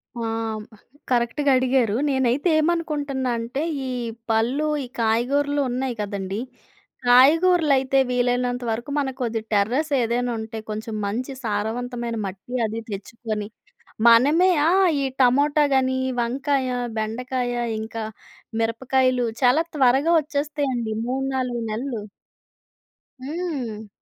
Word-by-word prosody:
ఆ! 235 - -6 0.9
కరెక్ట్‌గా 250 +4 +2
అడిగారు. 255 -4 +2
నేనైతే 265 +5 +1
ఏమనుకుంటున్నా 295 -6 -1
అంటే 240 +5 -3 0.3
ఈ - - -3 0.4
పళ్ళు, 240 +7 +1 0.2
ఈ - - -5 0.2
కాయగూరలు 280 +6 +1
ఉన్నాయి 250 0 -2
గదండీ. 200 -1 -3 0.7
కాయగూరలైతే 275 0 +5
వీలైనంత 245 0 0
వరకు 240 +6 -4
మనకు 265 -1 -3
కొద్ది 225 -1 -1
టెర్రస్ 245 +10 +1
ఏదైనా 240 +1 0
ఉంటే 220 0 -6
కొంచెం 215 +1 -5
మంచి 250 +7 -3
సారవంతమైన 235 +2 -2
మట్టి 195 +6 -8
అది 220 +1 -3
తెచ్చుకొని, 210 +1 -5 0.6
మనమే 290 +11 +6 0.2
ఆ! - - +3 0.3
ఈ - - +1 0.2
టమోటా 285 +4 +4
గాని, 260 0 +2 0.2
వంకాయ, 270 +2 0 0.3
బెండకాయ, 245 +3 -2 0.3
ఇంకా 225 0 -5 0.6
మిరపకాయలు 255 +2 +1 0.2
చాలా 255 +6 +5
త్వరగా 270 +4 +4
ఒచ్చేస్తాయండి 285 -6 -2
3,4 260 -2 -2
నెలలు. 235 0 -3 1.2
హ్మ్. 265 -9 -4
250 Hz, 100 wpm, -23 LUFS, 230-275 Hz, 1.2 s, మనమే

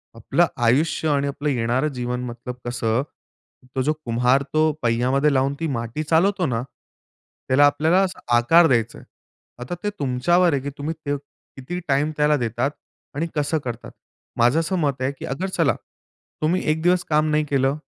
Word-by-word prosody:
आपलं 115 +9 +2 0.2
आयुष्य 145 +7 +2
आणि 140 -1 +1
आपलं 145 +1 -2
येणारं 125 +3 0
जीवन 125 0 -3
मतलब 120 +1 -7
कसं, 120 -1 0 0.7
तो 130 - +1
जो 150 +4 +1
कुम्हार 125 +3 +2
तो 155 0 +3
पय्यामध्ये 130 +5 +2
लावून 135 +1 +1
ती 165 - -1
माटी 120 +1 -3
चालवतो 180 +5 +2
ना, 120 -5 -1 0.9
त्याला 135 +3 +5
आपल्याला 155 +6 +3
असा 185 -1 -3 0.2
आकार 165 +8 +5
द्यायचं 120 -4 +1
आहे. - - -16 0.6
आता 125 +8 -4
ते 205 - 0
तुमच्यावर 155 +7 +2
आहे 135 - 0
की 140 - -4
तुम्ही 150 +3 -3
त 145 - +1 0.4
किती 140 +7 -5
टाईम 145 +3 +1
त्याला 150 0 +3
देतात 120 +3 -1 0.4
आणि 160 +4 -1
कसं 150 +1 0
करतात. 120 -1 -6 0.5
माझं 120 +6 +4
असं 165 +3 -1
मत 140 -4 -1
आहे, 130 +2 0
की 140 - -9
अगर 160 +9 -3
चला, - - +1 0.7
तुम्ही 165 +4 +1
एक 155 +1 -1
दिवस 180 +1 +3
काम 155 0 +2
नाही 155 0 +2
केलं, 135 0 +1
140 Hz, 170 wpm, -22 LUFS, 125-155 Hz, 0.9 s, त्याला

